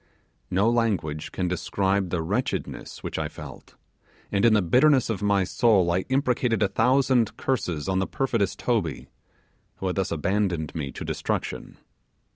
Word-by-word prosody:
No 100 +4 +2
language 100 -11 0
can 90 - -2
describe 95 +1 0
the 85 -2 -1
wretchedness - - -3
which - - -3
I - - -1
felt; - - -11 0.6
and 100 0 +1
in 115 -2 +6
the 105 - +4
bitterness 130 - +4
of 100 - -3
my 100 -1 +2
soul 95 -3 +3
I 90 +2 0
imprecated 125 -4 +1
a - - +3
thousand 125 -1 +2
curses 90 - -2
on 95 -1 +1
the 95 - 0
perfidious 115 -7 0
Toby, 100 - -2 0.7
who - - -7
had 90 0 -1
thus 95 - 0
abandoned 85 -1 -1
me 75 -4 -4
to - - -7
destruction. - - -3
100 Hz, 155 wpm, -25 LUFS, 90-115 Hz, 0.7 s, in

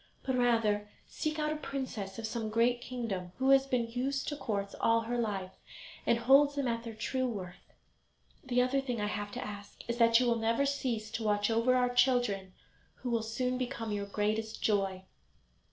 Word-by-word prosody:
But 260 - 0
rather 225 -4 +2 0.2
seek 310 0 -3
out 305 0 0
a - - -4
princess 255 -10 -5
of 225 - -4
some 220 0 -3
great 235 +2 +2
kingdom, 205 -9 -4
who 265 +1 +3
has 270 0 +5
been 245 -3 +1
used 270 +3 -1
to 295 - -3
courts 200 -7 -3
all 230 0 +4
her 235 +2 -3
life, 195 -5 -2 0.6
and 235 - +4
holds 275 +4 +5
them 280 -2 0
at 230 -1 -1
their 230 -2 -7
true 260 +4 -1
worth. 185 -7 -7 0.7
The 250 -1 +2
other 270 +2 +1
thing 250 -4 -3
I 210 - 0
have 205 0 -3
to 250 - -4
ask 205 -1 -9
is, 235 +1 -2
that 230 0 +6
you 250 - +2
will 235 -1 +2
never 230 +4 +1
cease 245 -6 -2
to 225 - -3
watch 205 0 +2
over 230 +3 +3
our 250 -1 +2
children, 245 -7 +2 0.4
who 250 - -5
will 230 -1 +2
soon 250 +3 -2
become 245 -3 -3
your 200 -1 -2
greatest 215 +2 -1
joy." 195 -3 +1
230 Hz, 195 wpm, -32 LUFS, 210-255 Hz, 0.7 s, that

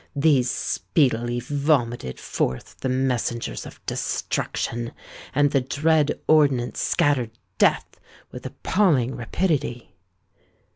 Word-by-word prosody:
These 140 -4 +3
speedily 120 -4 0
vomited 130 - 0
forth 65 - -3
the 130 - -2
messengers 125 -2 -1
of - - -14
destruction; 120 0 -2 0.4
and 145 0 +4
the 135 - +3
dread 150 +3 +1
ordnance 140 -6 +3
scattered 125 -6 +1 0.2
death - - +2 0.3
with - - -9
appalling 150 - +1
rapidity. 140 -2 -2
130 Hz, 95 wpm, -24 LUFS, 120-145 Hz, 0.4 s, and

